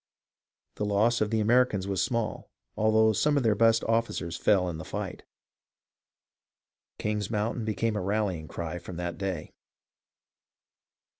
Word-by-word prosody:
The - - -2
loss 110 +4 +2
of 105 - +2
the 110 0 +1
Americans 110 -3 +3
was 95 -2 0
small, 115 -3 -2 0.3
although 110 0 +4
some 150 +6 +2
of 140 - +1
their 110 -2 +4
best 115 +1 +4
officers 115 -7 -1
fell 95 -1 +2
in 80 -2 -4
the - - -6
fight. - - -5 1.8
King's 105 -2 -2
Moun 110 +2 -1
tain 115 - -3
became 110 +1 -1
a 105 - -1
rallying 95 -5 -1
cry 85 +1 -5
from 85 0 -9
that 85 +1 -4
day. 95 -5 -4
105 Hz, 145 wpm, -28 LUFS, 95-115 Hz, 1.8 s, although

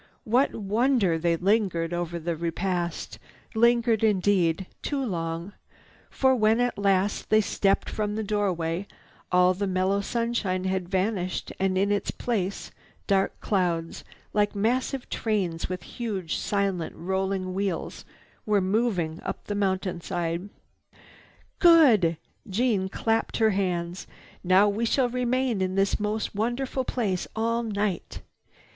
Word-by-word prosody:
What 250 +5 +2
wonder 210 -4 +1
they 170 0 +2
lingered 180 -3 +1
over 175 0 -2
the 170 0 -2
repast—lingered 195 +7 -1
indeed 190 -4 +2 0.2
too 275 -2 -2
long, 170 -1 -3 0.6
for, 265 -1 +3
when 220 0 +3
at 245 -3 0
last 200 0 +1
they 215 - +5
stepped 200 -2 +1
from 210 -1 -2
the 220 - -2
doorway 190 -4 -1 0.4
all 180 0 +5
the 200 +2 -2
mellow 190 +2 +1
sunshine 225 -5 -1
had 185 -1 -2
vanished 190 -1 -1
and 190 -1 +1
in 200 +2 +2
its 205 - 0
place 200 -5 -2 0.3
dark 195 -1 +1
clouds, 175 -5 -1 0.3
like 205 -1 +1
massive 245 +5 0
trains 185 -8 -1
with 180 -2 -4
huge 200 -8 -4
silently 195 -4 -1
rolling 190 +1 -1
wheels 195 -2 -3 0.4
were 210 -1 +2
moving 190 -5 0
up - - -5
the 205 - -3
mountainside. 185 -2 -2 1.1
"Good!" 250 - +6 0.3
Jeanne 200 -2 +1
clapped 225 +3 0
her 220 -1 +4
hands. 180 -2 -2 0.4
"Now 185 +3 +5
we 205 +3 -1
shall 245 +2 +2
remain 250 -2 0
in 185 0 -1
this 195 0 +1
most 210 +1 -2
wonderful 245 +5 -1
place 200 -9 -1
all 230 +1 0
night. 205 -5 -3
200 Hz, 125 wpm, -26 LUFS, 180-220 Hz, 1.1 s, Good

